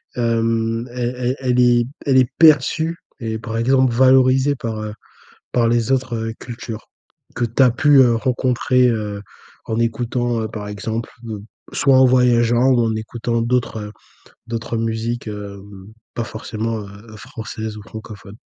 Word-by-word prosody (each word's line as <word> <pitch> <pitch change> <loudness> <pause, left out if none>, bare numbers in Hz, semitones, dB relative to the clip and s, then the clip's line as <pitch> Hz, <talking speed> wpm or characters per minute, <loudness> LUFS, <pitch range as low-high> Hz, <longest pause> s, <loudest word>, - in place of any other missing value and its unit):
hem, 115 0 0
elle 125 0 -2
elle 125 +1 -1
elle 125 -2 +1
est 120 -1 +4 0.2
elle 135 -2 +3
est 130 -2 +4
perçue 160 +1 +4 0.2
et 110 -2 -3
par 115 +1 -5
exemple 130 +1 +3
valorisée 130 +2 +4
par, 115 -4 -4
heu 105 0 -5 0.6
par 120 -2 +2
les 120 +1 +1
autres, 130 -2 0
heu, 115 0 -4
cultures, 115 -2 -8 0.5
que 120 - 0
tu 120 +4 +1
as 125 - +6
pu, 140 +4 +4
heu, 120 -3 +5
rencontrer, 125 0 +1
heu, 105 -3 -2 0.4
en 110 - -2
écoutant 120 +1 -1
heu, 110 - -3
par 105 -1 -7
exemple, 110 +3 -4
donc 110 -3 -6 0.3
soit 135 -2 +3
en 130 - +7
voyageant 125 -1 +4
ou 125 -2 +4
en 115 -1 +1
écoutant 115 +1 -2
d'autres 120 -1 0
heu 105 - -10 0.6
d'autres 115 0 -4
musiques, 115 +1 -2
hem, 100 -2 -9 0.3
pas 115 - -1
forcément, 110 0 -4
heu, 105 +2 -11
françaises 110 -2 -7
ou 105 - -10
francophones? 105 +1 -11
115 Hz, 160 wpm, -20 LUFS, 110-125 Hz, 0.6 s, en